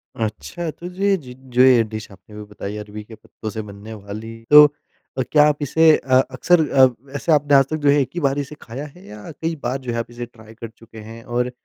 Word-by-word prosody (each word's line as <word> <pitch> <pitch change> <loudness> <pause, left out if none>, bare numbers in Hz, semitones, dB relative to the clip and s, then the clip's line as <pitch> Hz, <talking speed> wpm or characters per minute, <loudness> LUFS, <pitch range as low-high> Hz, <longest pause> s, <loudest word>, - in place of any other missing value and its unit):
अच्छा, 115 +10 -4
तो 175 - -10
जो 185 +2 -6
ये 200 -1 +3
ज 125 -6 -11 0.2
जो 125 - +4
ये 125 -3 +6
डिश 110 0 -8
आपने 95 +2 -16
अभी 105 - -8
बताई 105 0 -6
अरबी 105 0 -8
के 110 +1 -13
पत्तों 110 - -9
से 110 0 -5
बनने 105 +1 -10
वाली, 110 +2 -9
तो 150 0 +10 0.5
अ, - - +1
क्या 150 0 +6
आप 150 -1 +1
इसे 160 +3 +4
अ, 130 - -4 0.2
अक्सर 165 -3 +2
अ, 130 -1 +6
वैसे 135 +6 -4
आपने 145 -1 +4
आज 135 -1 +6
तक 155 - -2
जो - - +6
है 145 +1 +4
एक 130 - -2
ही - - -1
बार 140 0 +1
इसे 145 +2 -6
खाया 135 +6 -7
है 185 - -16
या 105 +4 -10
कई 165 +2 -4
बार 125 +3 -1
जो 125 -2 -4
है 115 - -3
आप 115 - -5
इसे 120 0 -6
ट्राय 110 -2 -17
कर 115 0 -9
चुके 115 0 -17
हैं 115 0 -11
और 125 +1 -2
125 Hz, 255 wpm, -21 LUFS, 110-145 Hz, 0.5 s, तो